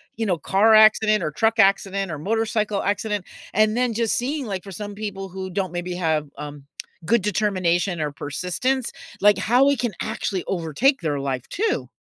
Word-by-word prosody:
you 225 Hz, -, -2 dB
know, 185 Hz, -5 st, +1 dB
car 195 Hz, +8 st, +3 dB
accident 215 Hz, 0 st, +5 dB
or 155 Hz, -, -2 dB
truck 225 Hz, +8 st, +1 dB
accident 195 Hz, -2 st, +2 dB
or 155 Hz, -, -4 dB
motorcycle 215 Hz, +2 st, -1 dB
accident, 205 Hz, -1 st, -1 dB, 0.3 s
and 215 Hz, +1 st, +3 dB
then 245 Hz, -1 st, +1 dB
just 230 Hz, -1 st, +1 dB
seeing, 275 Hz, +3 st, -2 dB
like, 195 Hz, -5 st, -4 dB
for 195 Hz, -, -10 dB
some 205 Hz, +3 st, -6 dB
people 200 Hz, -2 st, -5 dB
who 190 Hz, +1 st, -6 dB
don't 185 Hz, -1 st, -3 dB
maybe 175 Hz, 0 st, -4 dB
have, 160 Hz, -4 st, 0 dB
um, 145 Hz, -1 st, -8 dB, 0.4 s
good 230 Hz, +6 st, +3 dB
determination 185 Hz, -4 st, 0 dB
or 150 Hz, -1 st, -1 dB
persistence, 180 Hz, -, -2 dB, 0.3 s
like 205 Hz, +1 st, +5 dB
how 250 Hz, +4 st, +4 dB
it 280 Hz, -, +1 dB
can 240 Hz, -2 st, 0 dB
actually 190 Hz, -3 st, -3 dB
overtake 190 Hz, -, +1 dB
their 150 Hz, -4 st, -1 dB
life 135 Hz, -3 st, -3 dB
too. 425 Hz, +3 st, -1 dB
200 Hz, 180 wpm, -23 LUFS, 175-220 Hz, 0.4 s, accident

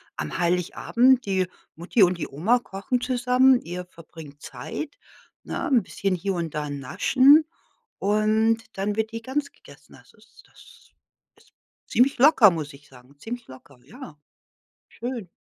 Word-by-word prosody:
Am 75 Hz, -, -5 dB
Heiligabend, 205 Hz, +9 st, +2 dB
die 190 Hz, -2 st, 0 dB, 0.3 s
Mutti 175 Hz, +7 st, -1 dB
und 180 Hz, -2 st, +4 dB
die -, -, -4 dB
Oma 180 Hz, -, +1 dB
kochen 240 Hz, +2 st, -4 dB
zusammen. 250 Hz, +1 st, +3 dB
Ihr 180 Hz, +1 st, -7 dB
verbringt 160 Hz, -4 st, -14 dB
Zeit, -, -, -7 dB, 0.5 s
ne, -, -, -4 dB
'n 255 Hz, -5 st, +3 dB
bisschen 195 Hz, -2 st, -2 dB
hier 195 Hz, +2 st, -3 dB
und 170 Hz, -4 st, -4 dB
da 150 Hz, -1 st, -3 dB
naschen 260 Hz, -, +4 dB, 0.5 s
und 215 Hz, +2 st, +1 dB
dann 200 Hz, +2 st, -2 dB
wird 220 Hz, +1 st, -2 dB
die 230 Hz, 0 st, -6 dB
Gans 280 Hz, +3 st, -3 dB
gegessen. -, -, -18 dB
Das -, -, -19 dB
ist -, -, -22 dB
das -, -, -20 dB, 0.5 s
ist -, -, -30 dB, 0.3 s
ziemlich 260 Hz, +2 st, +2 dB
locker, 265 Hz, -6 st, +7 dB
muss 155 Hz, -4 st, -5 dB
ich 145 Hz, +1 st, -17 dB
sagen. 130 Hz, +2 st, -19 dB
Ziemlich 240 Hz, +5 st, -7 dB
locker, 130 Hz, 0 st, -15 dB
ja. 205 Hz, -, -12 dB, 0.7 s
Schön. 235 Hz, -6 st, -6 dB
200 Hz, 150 wpm, -24 LUFS, 165-245 Hz, 0.7 s, locker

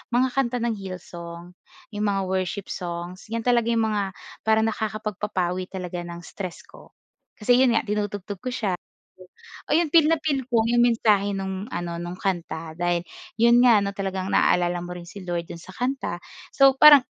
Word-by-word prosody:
mga 255 Hz, +1 st, +3 dB
kanta 245 Hz, -2 st, 0 dB
ng 230 Hz, -3 st, -1 dB
Hillsong 175 Hz, -2 st, -8 dB, 0.4 s
'yong 210 Hz, 0 st, -2 dB
mga 195 Hz, -1 st, +1 dB
worship 190 Hz, +1 st, -2 dB
songs. 175 Hz, +1 st, -6 dB
'Yan 230 Hz, +1 st, -3 dB
talaga 240 Hz, -1 st, +2 dB
'yong 230 Hz, -1 st, +2 dB
mga 205 Hz, -3 st, -1 dB, 0.3 s
parang 220 Hz, 0 st, +4 dB
nakakapagpapawi 210 Hz, -4 st, -2 dB
talaga 180 Hz, -2 st, -5 dB
ng 170 Hz, 0 st, -8 dB
stress 185 Hz, -3 st, -7 dB
ko. -, -, -17 dB, 0.5 s
Kasi 245 Hz, +3 st, +4 dB
'yon 255 Hz, -, +5 dB, 0.5 s
nga 205 Hz, -, -4 dB
tinutugtog 195 Hz, 0 st, -8 dB
ko 255 Hz, -, -1 dB
siya. 215 Hz, -6 st, -1 dB, 1.0 s
Ayun 325 Hz, +2 st, +3 dB
feel 325 Hz, -3 st, +7 dB
na 325 Hz, -, +2 dB
feel 280 Hz, -4 st, 0 dB
ko 235 Hz, -2 st, +4 dB
'yong 240 Hz, +1 st, +3 dB
mensahe 210 Hz, -4 st, +3 dB
nung 190 Hz, 0 st, -4 dB
ano, 170 Hz, -1 st, -3 dB
nung 175 Hz, +1 st, -6 dB
kanta 165 Hz, -4 st, -3 dB
dahil 175 Hz, 0 st, +1 dB, 0.4 s
'yon 235 Hz, +1 st, +6 dB
nga 235 Hz, -4 st, +6 dB
'no, 200 Hz, 0 st, -2 dB
talagang 190 Hz, -1 st, -3 dB
naalala 175 Hz, 0 st, +2 dB
mo 175 Hz, -, -6 dB
rin 175 Hz, -1 st, -10 dB
si 200 Hz, +2 st, -9 dB
Lord 175 Hz, -1 st, -3 dB
dun 170 Hz, -, -7 dB
sa 185 Hz, -, -12 dB
kanta. 250 Hz, -7 st, -2 dB, 0.4 s
So 270 Hz, -1 st, +6 dB
parang 295 Hz, 0 st, +10 dB
200 Hz, 175 wpm, -24 LUFS, 180-235 Hz, 1.0 s, parang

